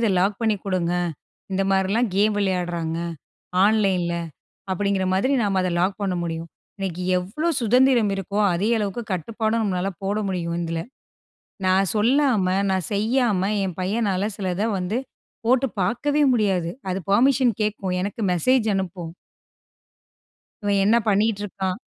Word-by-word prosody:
இதை 225 -3 +2
லாக் 200 +3 0
பண்ணி 220 -2 +2
கொடுங்க, 180 -3 0 0.6
இந்த 195 +1 +1
மாதிரிலாம் 200 +5 +2
கேம் 210 +1 +3
விளையாடுறாங்க 175 -4 -1 0.7
ஆன்லைனில, 195 -5 +2 0.6
அப்படிங்கிற 195 0 0
மாதிரி 230 +9 +1
நாம் 195 -2 +1
அதை 185 - 0
லாக் 190 +3 0
பண்ண 190 -2 0
முடியும், 165 0 -4 0.3
இன்னைக்கு 185 -2 -3 0.2
எவ்வளோ 210 - -2
சுதந்திரம் 240 -1 +4
இருக்கோ, 195 +1 -3 0.2
அதே 195 +5 0
அளவுக்கு 210 +2 -2
கட்டுப்பாடும் 220 +5 -1
நம்மளால 190 -1 -1
போட 200 +2 0
முடியும் 170 -3 -2
இதில, 165 0 -2 0.8
நான் 190 0 +3
சொல்லாம, 235 -2 +3 0.2
நான் 190 -3 -1
செய்யாம, 220 -1 +1 0.2
என் 185 -3 -4
பையனால 195 0 0
சிலத 190 -1 -2 0.2
வந்து 185 +6 -1 0.5
போட்டு 255 +2 +3
பார்க்கவே 290 +10 +1
முடியாது. 190 -7 +1 0.2
அது 185 - -1
பெர்மிஷன் 255 +3 +4
கேட்கும், 200 -3 -1
எனக்கு 200 +4 -4
மெசேஜ் 230 +7 +2
அனுப்பும். 180 -3 -4 1.5
இவன் 200 -1 +2
என்ன 230 +3 +5
பண்ணிட்டு 210 0 +2
இருக்கான்? 190 -2 -3
195 Hz, 130 wpm, -23 LUFS, 185-220 Hz, 1.5 s, என்ன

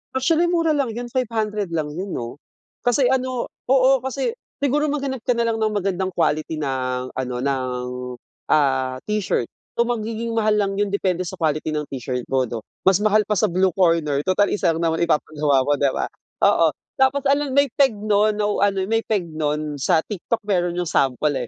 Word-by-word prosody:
Actually, 325 +6 +2
mura 335 -2 +2
lang 275 -6 0
yun, 240 0 -5
500 215 -5 -1
lang 155 -2 -1
yun 185 +5 -5
'no. 120 +4 -6 0.5
Kasi 245 +1 +3
ano 255 -2 -1 0.2
oo 265 0 +5
kasi 265 - -2 0.3
siguro 295 +2 +2
maghanap 275 -3 -2
ka 245 - +3
na 235 - +1
lang 225 -1 0
ng 215 -1 0
magandang 190 -1 -1
quality 155 -1 0
ng 130 -3 -2
ano, 125 -1 -4
ng, 130 -2 -1 0.7
ah, 130 -3 +2
t-shirt. 210 - -1 0.3
So 235 - +4
magiging 230 0 -3
mahal 215 -1 +2
lang 200 -1 +1
yun 205 - +1
depende 185 -3 0
sa 190 - -5
quality 155 -1 0
ng 150 -1 -2
t-shirt 125 -2 -3
mo 130 -1 +2
'no. 115 -1 -5 0.2
Mas 190 +1 +5
mahal 215 -1 +3
pa 210 - +1
sa 175 - +2
Blue 185 0 +2
Corner 165 -6 +2
tutal 190 +2 +2
isa 170 - +2
lang 165 +1 -3
naman 165 +1 0
ipapagawa 150 -3 +1
mo 145 - +4
'di 140 -1 +1
ba? - - -2 0.4
Oo, - - +5 0.3
tapos 270 +1 +2
alam 280 +1 +2
may 280 +1 +5
peg 270 -5 +5
non 210 0 +2
ano, 205 -1 +1
may 225 0 +2
peg 205 -5 0
nun 150 -1 -2
sa 160 +4 +2
TikTok 215 +3 -3
meron 175 -3 0
yung 180 - 0
sample 140 0 +1
195 Hz, 185 wpm, -22 LUFS, 150-235 Hz, 0.7 s, oo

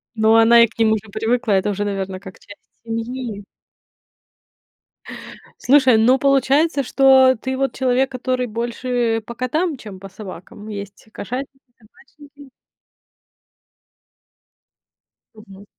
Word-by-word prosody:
Ну, 220 0 +3
она 230 +1 +6
и - - +3
к 230 - -25
ним 225 -1 +3
уже 220 0 -4
привыкла. 225 +1 -1
Это 190 +1 +1
уже, 205 0 -2
наверно, 195 -2 -4
как 190 -1 -13
часть 205 - -14 0.3
семьи. 230 -1 -5 2.2
Слушай, 260 -3 +4
ну, 250 +4 +3
получается, 275 +2 +2
что 265 0 +4
ты 260 +3 -5
вот 270 -2 -1
человек, 260 +1 0
который 255 0 -2
больше 235 0 -2
по 235 - -8
котам, 305 +7 -2
чем 210 -6 -11
по 195 - -10
собакам? 195 +1 -11
Есть 200 -1 -9
кошатники, 265 +6 -7 0.2
собачники. 280 +5 -19 2.9
Мгм. 200 -2 -15
235 Hz, 120 wpm, -19 LUFS, 210-260 Hz, 2.9 s, она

